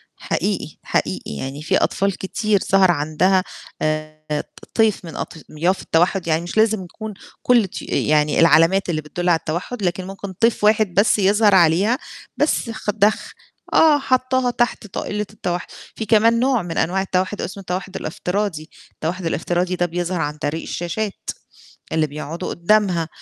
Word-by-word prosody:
حقيقي، - - -2
حقيقي، - - -2
يعني 135 - -5
في - - +2
أطفال 195 -1 0
كتير 205 +1 0
ظَهَر 190 -2 +6
عندها 170 +5 +2 0.4
آآ، 155 -1 -2
ط - - -20
طيف 220 -5 +2
من 165 - -8
أطياف 165 +3 -2
التوحُّد، 175 +2 +1
يعني 160 +1 +2
مش 175 +5 -6
لازم 220 -3 +3
يكون 215 +4 -8 0.3
كُلّ 235 -5 +4
طيو - - -8
يعني 150 0 +2
العلامات 165 +3 +5
اللي 155 -2 -1
بتدُّل 175 +4 -3
على 165 -2 +4
التوحُّد، 185 +7 -4
لكن 180 +1 -1
ممكن 195 0 -7
طيف 225 +2 +1
واحد 210 -3 +3
بس 205 +1 +3
يظهر 205 +1 +4
عليها، 185 +8 +4 0.4
بس 295 -5 +1
خ 220 -1 -5
دخ 210 +1 +1 0.4
آه، 305 -2 +6
حاطاها 255 -1 +1
تحت 240 -2 -1
طائلة 210 +2 -3
التوحُّد، 175 -4 -3 0.3
في 220 - -4
كمان 225 +2 +4
نوع 255 -3 +2
من 170 -2 -5
أنواع 190 +3 +1
التوحُّد، 190 +2 -1
اسمه 195 +3 -5
التوحُّد 185 +1 -5
الافتراضي، 180 -1 -3 0.2
التوحُّد 175 +3 -4
الافتراضي 175 +3 -1
ده 175 - +1
بيظهر 175 0 -2
عن 150 0 -3
طريق 150 +2 -2
الشاشات 195 +4 -4 0.6
اللي 160 -1 +1
بيقعدوا 150 +3 -5
قُدَّامها، 175 -2 +2
185 Hz, 155 wpm, -21 LUFS, 165-210 Hz, 0.6 s, ظَهَر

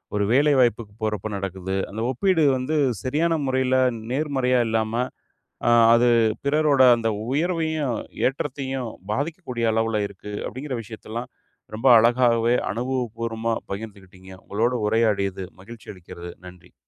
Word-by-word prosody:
ஒரு 105 - +1
வேலை 145 +2 +4
வாய்ப்புக்கு 110 -3 0
போறப்ப 105 -1 -2
நடக்குது. 95 0 -4
அந்த 110 +3 -5
ஒப்பீடு 175 +4 +2
வந்து 135 +5 -2 0.3
சரியான 155 +6 +1
முறையில 130 0 +1 0.4
நேர்மறையா 130 -3 +1
இல்லாம, 110 0 -1 0.8
அ - - +5 0.2
அது 120 +1 +4 0.4
பிறரோட 145 -1 +3 0.2
அந்த 115 -1 -1 0.3
உயர்வையும், 160 -6 -1 0.3
ஏற்றத்தையும் 135 -2 -4 0.2
பாதிக்கக்கூடிய 140 -3 -3
அளவுல 115 -1 0
இருக்கு; 100 +1 -10
அப்பிடிங்குற 130 +2 -5
விஷயத்தல்லாம் 110 +2 -7 0.4
ரொம்ப 115 +5 +1
அழகாவே 120 0 +3 0.2
அனுபவபூர்வமா 115 -1 -2 0.2
பகிர்ந்துக்கிட்டீங்க. 100 -3 -9
உங்களோட 115 +5 0
உரையாடியது 100 -4 0 0.2
மகிழ்ச்சி 115 +2 -13
அளிக்கிறது. 85 -1 -10
நன்றி. 90 -1 -14
120 Hz, 115 wpm, -23 LUFS, 105-135 Hz, 0.8 s, அ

